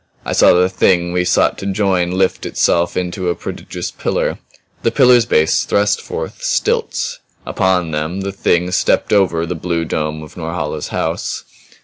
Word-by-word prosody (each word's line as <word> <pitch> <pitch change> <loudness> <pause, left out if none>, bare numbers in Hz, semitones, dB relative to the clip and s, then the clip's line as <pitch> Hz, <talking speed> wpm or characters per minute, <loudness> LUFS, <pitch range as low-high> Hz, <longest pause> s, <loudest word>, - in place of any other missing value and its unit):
I - - -2
saw - - +6
the 90 +1 +4
Thing 90 -1 +1
we 90 0 +1
sought - - +2
to 100 - -5
join 95 -3 +1
lift 95 +1 0
itself 85 0 +1
into 90 0 -2
a 85 - 0
prodigious - - -6
pillar; - - -2 0.4
the - - +2
pillar's 125 -3 +5
base 80 +1 +3
thrust 100 0 +1
forth 475 +2 -6
stilts; 480 0 -1 0.3
upon 95 -4 0
them 80 +5 -2
the 100 0 -3
Thing 90 -2 0
stepped 95 - +1
over 90 -5 +2
the 85 - -3
blue 85 0 -2
dome 75 -1 -3
of 75 - -13
Norhala's 80 -3 -4
house. - - -3
90 Hz, 160 wpm, -17 LUFS, 85-100 Hz, 0.4 s, saw